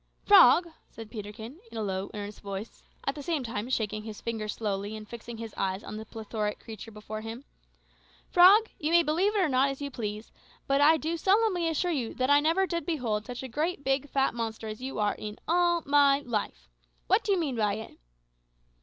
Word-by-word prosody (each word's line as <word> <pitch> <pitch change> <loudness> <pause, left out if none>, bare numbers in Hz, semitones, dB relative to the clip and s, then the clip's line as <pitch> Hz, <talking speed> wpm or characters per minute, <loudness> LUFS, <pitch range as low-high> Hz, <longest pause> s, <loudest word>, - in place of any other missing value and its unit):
"Frog," 345 -4 +7 0.2
said 225 -1 -11
Peterkin, 220 - -8
in - - -8
a 220 - -1
low, 190 -1 -3
earnest 205 0 -7
voice, 200 +2 -7 0.2
at 275 - 0
the 290 - -8
same 305 -1 -1
time 230 0 -4
shaking 215 -4 -1
his 215 -1 -8
finger 225 -2 -4
slowly 205 -1 -3
and 215 0 -10
fixing 235 +1 -8
his 225 -1 -7
eyes 190 +1 -2
on - - -7
the 220 0 -8
plethoric 215 -2 -4
creature 225 -1 -9
before 215 0 -7
him 225 +5 -7 0.8
"frog, 395 +5 +7
you 305 - -1
may 340 0 +6
believe 355 +8 +1
it - - +3
or 365 - +3
not 270 0 +3
as 275 - -5
you 285 -1 -4
please, 215 -2 -5 0.3
but 275 +1 +2
I 315 +2 +6
do 320 +2 -2
solemnly 385 -2 +2
assure 330 +2 0
you 255 -8 -2
that 255 +2 +1
I 285 - +7
never 330 +6 +2
did 340 -2 -2
behold 235 -11 -2
such 245 +1 -6
a - - -4
great, 300 +5 -2
big, 270 +1 0
fat 270 0 +1
monster 225 -1 -4
as 215 +2 -7
you 265 +1 -5
are 210 -1 +1
in 210 0 -7
all 345 0 +2
my 280 0 +4
life! 210 - -4 0.4
What - - +3
do - - 0
you 390 - +3
mean 300 -7 -1
by 210 -2 +1
it?" 220 +1 -9
245 Hz, 210 wpm, -28 LUFS, 215-310 Hz, 0.8 s, Frog